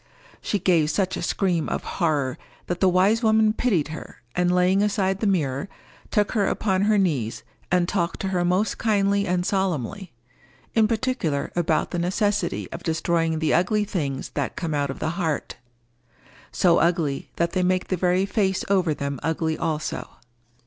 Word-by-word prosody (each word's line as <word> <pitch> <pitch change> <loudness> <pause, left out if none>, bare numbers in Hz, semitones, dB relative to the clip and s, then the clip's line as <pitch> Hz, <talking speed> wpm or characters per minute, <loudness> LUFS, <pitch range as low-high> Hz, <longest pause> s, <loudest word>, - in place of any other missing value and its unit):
She 205 - -1
gave 170 -5 +2
such 185 +1 0
a - - -4
scream 175 -2 0
of - - -2 0.2
horror 145 -6 +1 0.3
that 175 0 -3
the 190 - +4
wise 195 +5 +3
woman 220 -1 +4
pitied 200 -11 +1
her, 155 -5 -9
and 180 0 +2
laying 180 +2 +3
aside 195 -2 +1
the 215 - 0
mirror, 155 -3 0 0.4
took 205 -1 +1
her 205 -4 +1
upon 190 -3 0
her 215 0 +3
knees, 125 - 0 0.3
and 180 -1 +3
talked 170 -3 -1
to 195 - -1
her 180 -2 0
most 185 +4 +1
kindly 200 -2 +2
and 180 0 0
solemnly; 190 - -2 0.6
in 220 -1 +4
particular 220 - -1
about 165 -2 +1
the 175 - -2
necessity 205 +4 0
of - - -6
destroying 165 0 0
the 155 -1 +1
ugly 205 +5 +2
things 140 -9 -3
that 140 -2 -3
come 165 -3 -3
out 145 -1 0
of 135 - -5
the 160 - -2
heart—so 120 +3 -3
ugly 165 -5 0
that 170 0 0
they 185 - 0
make 185 0 0
the 185 - +1
very 180 +1 +2
face 195 -2 0
over 180 -6 +2
them 140 -2 -4
ugly 160 0 -1
also. 155 -2 -3
180 Hz, 170 wpm, -24 LUFS, 155-195 Hz, 0.6 s, the